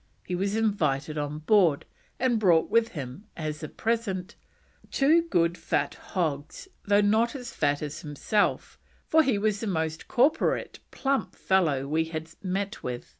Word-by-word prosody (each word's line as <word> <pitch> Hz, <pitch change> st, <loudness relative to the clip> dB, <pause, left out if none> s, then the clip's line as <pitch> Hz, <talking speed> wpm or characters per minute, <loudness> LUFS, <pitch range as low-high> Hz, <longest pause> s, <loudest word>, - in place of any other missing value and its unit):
He -, -, -4 dB
was 195 Hz, +3 st, 0 dB
invited 155 Hz, -10 st, 0 dB
on 145 Hz, 0 st, -3 dB
board, 165 Hz, -2 st, +3 dB, 0.3 s
and 245 Hz, -3 st, +2 dB
brought 175 Hz, -6 st, +3 dB
with 230 Hz, 0 st, +4 dB
him 135 Hz, -, -6 dB
as 155 Hz, -2 st, -4 dB
a 155 Hz, -, -5 dB
present: 210 Hz, -5 st, -2 dB, 0.5 s
"two 305 Hz, +5 st, +4 dB
good 175 Hz, -, +1 dB
fat -, -, 0 dB
hogs, 155 Hz, -, -4 dB, 0.2 s
though 205 Hz, 0 st, +4 dB
not 220 Hz, +3 st, +3 dB
so 270 Hz, -3 st, -6 dB
fat 145 Hz, -, -1 dB
as 150 Hz, 0 st, -5 dB
himself, 155 Hz, +8 st, -1 dB, 0.3 s
for 320 Hz, -, +5 dB
he 260 Hz, -8 st, +1 dB
was 210 Hz, 0 st, 0 dB
the 225 Hz, -, -3 dB
most 160 Hz, -3 st, -2 dB
corporate, 280 Hz, +6 st, +1 dB
plump 275 Hz, 0 st, -1 dB
fellow 155 Hz, -8 st, +1 dB
we 160 Hz, +3 st, +1 dB
had 160 Hz, 0 st, -6 dB
met 195 Hz, +2 st, -3 dB
with. 125 Hz, -1 st, -5 dB
185 Hz, 155 wpm, -27 LUFS, 155-220 Hz, 0.5 s, for